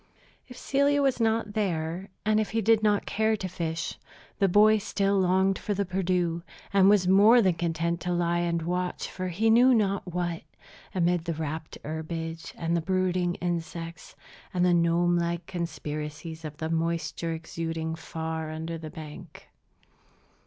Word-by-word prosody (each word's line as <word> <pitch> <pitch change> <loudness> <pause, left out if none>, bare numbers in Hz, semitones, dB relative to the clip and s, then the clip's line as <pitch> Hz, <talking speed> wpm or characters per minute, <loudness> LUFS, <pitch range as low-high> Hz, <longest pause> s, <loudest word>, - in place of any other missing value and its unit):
If 250 - -12
Celia 280 +1 +2
was 265 -3 +2
not 225 -2 +1
there, 180 -3 -2 0.2
and 215 0 +3
if 215 - -1
he 225 +1 0
did 225 +1 +4
not 210 -2 +2
care 220 0 +1
to 190 - -4
fish, 165 -2 -4 0.4
the 195 - +4
boy 210 +3 +5
still 200 -1 +1
longed 190 +1 +2
for 205 - -2
the 200 +1 0
Perdu, 180 -2 0 0.3
and 195 -1 +6
was 200 -3 +4
more 205 +6 +7
than 190 -5 +4
content 170 0 -1
to 180 - -2
lie 175 0 +1
and 170 -1 0
watch 180 +1 -2
for 185 0 -4
he 210 +6 +2
knew 250 +3 +6
not 200 -4 0
what, 175 -1 -2 0.5
amid 175 -1 +1
the 170 -2 -2
rapt 155 0 -5
herbage, 165 +1 -5
and 170 0 0
the 170 - +1
brooding 185 0 0
insects, 170 -1 -5 0.4
and 180 -1 +1
the 180 - +4
gnome 175 +1 +3
like 170 0 -2
conspiracies 160 -2 -5
of 150 -1 -7
the 160 +1 -3
moisture 165 0 -1
exuding 160 0 -4
far 160 -1 -4
under 160 +1 -5
the 155 -1 -7
bank. 155 0 -11
175 Hz, 160 wpm, -27 LUFS, 165-195 Hz, 0.5 s, more